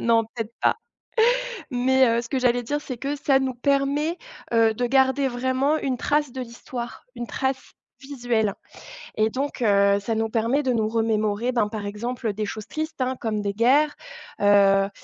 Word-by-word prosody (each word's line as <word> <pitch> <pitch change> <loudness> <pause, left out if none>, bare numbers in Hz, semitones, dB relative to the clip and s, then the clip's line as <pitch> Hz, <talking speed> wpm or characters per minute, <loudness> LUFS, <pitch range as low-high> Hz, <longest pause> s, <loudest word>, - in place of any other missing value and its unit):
Non, 230 -1 +3
peut-être 225 -2 -5
pas. - - +3 0.9
Mais, 260 +1 +3
heu, 230 0 +1
ce 235 - -9
que 265 - -1
j'allais 245 -1 +2
dire, 290 +5 -2
c'est 260 -4 -6
que 280 +4 -3
ça 275 -1 +3
nous 265 -1 -2
permet, 280 +6 0 0.3
heu, 225 -1 +4
de 245 +3 -1
garder 265 +1 +3
vraiment 260 +4 0
une 265 -4 -1
trace 295 +1 0
de 260 - -5
l'histoire, 235 -1 -7
une 240 -1 -5
trace 265 +2 -3 0.3
visuelle 245 -7 -1 0.6
et 215 +1 +1
donc, 270 0 -3
heu, 200 -1 +4
ça 225 +3 -3
nous 225 0 -1
permet 230 +5 +1
de 265 -3 0
nous 220 -2 +1
remémorer, 220 0 0
ben, 230 -4 +1
par 210 -2 -5
exemple, 230 +2 -3
des 210 +1 -3
choses 215 0 -6
tristes, 315 -2 -4
hein, 255 0 0
comme 215 -2 -2
des 200 -1 -2
guerres, 270 +8 +3 0.5
heu, 200 -1 +5
240 Hz, 180 wpm, -24 LUFS, 220-265 Hz, 0.9 s, heu